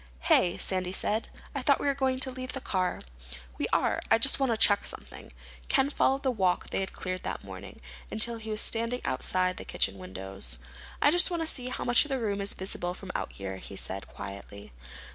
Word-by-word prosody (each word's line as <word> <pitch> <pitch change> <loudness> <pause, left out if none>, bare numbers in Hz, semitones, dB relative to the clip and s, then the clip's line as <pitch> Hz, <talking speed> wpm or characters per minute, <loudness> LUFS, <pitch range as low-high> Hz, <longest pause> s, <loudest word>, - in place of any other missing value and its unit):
"Hey," 175 - +3
Sandy 185 -1 0
said, 215 +3 0 0.2
"I - - -2
thought - - +4
we - - -3
were 280 - +3
going 265 -1 0
to 265 - +4
leave 255 0 -6
the 270 - -3
car." 185 -7 -1 0.6
"We - - 0
are. - - +2
I 225 - +6
just 270 +5 +4
want 270 -3 +2
to 225 - +1
check 205 -2 +5
something." - - -7 0.4
Ken 275 +1 +2
followed 270 -1 +2
the 265 - +2
walk 190 -6 0
they - - 0
had 190 - -2
cleared 185 0 -4
that - - -5
morning, - - -10 0.3
until 230 +2 +4
he 220 0 -8
was 215 0 0
standing 230 +2 -1
outside 185 +7 0
the - - -6
kitchen 95 0 0
windows. 95 -8 -4 0.5
"I 290 - +6
just 350 +3 +6
want 340 -2 -1
to - - -2
see 255 -5 +1
how - - -4
much 240 -1 +6
of 300 - -9
the 270 - 0
room 205 -4 -1
is 200 - -1
visible 180 -1 -3
from 190 -1 -7
out - - -3
here," 95 -1 -6
he 100 - -9
said 95 0 -2
quietly. 100 -3 -9
205 Hz, 220 wpm, -29 LUFS, 175-255 Hz, 0.6 s, I